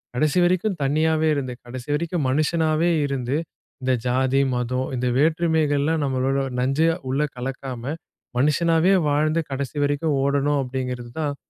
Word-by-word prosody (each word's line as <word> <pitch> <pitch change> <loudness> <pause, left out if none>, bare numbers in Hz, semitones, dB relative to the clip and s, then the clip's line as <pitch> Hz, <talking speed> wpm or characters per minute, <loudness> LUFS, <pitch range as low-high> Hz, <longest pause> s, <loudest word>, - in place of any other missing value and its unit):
கடைசி 150 +5 +1
வரைக்கும் 185 +2 +1
தனியாவே 155 +3 +2
இருந்து, 130 -3 -3
கடைசி 125 +2 -8
வரைக்கும் 165 0 -1
மனுஷனாவே 155 +3 +2
இருந்து, 135 -1 -1 0.5
இந்த 130 0 +2
ஜாதி, 130 +2 +2
மதம் 125 +1 -1
இந்த 125 +1 0
வேற்றுமைகள்லாம் 155 -1 +2
நம்மளோட 135 0 0 0.2
நஞ்சா 155 +6 +2 0.2
உள்ள 135 +3 +1 0.2
கலக்காம, 130 +1 -5 0.4
மனுஷனாவே 165 +5 +3 0.2
வாழ்ந்து 155 +3 +2
கடைசி 135 +1 -4
வரைக்கும் 145 +1 0
ஓடணும் 140 +1 +1
அப்பிடிங்கிறது 125 -2 -4
தான் 145 -2 -1
145 Hz, 125 wpm, -23 LUFS, 130-160 Hz, 0.5 s, மனுஷனாவே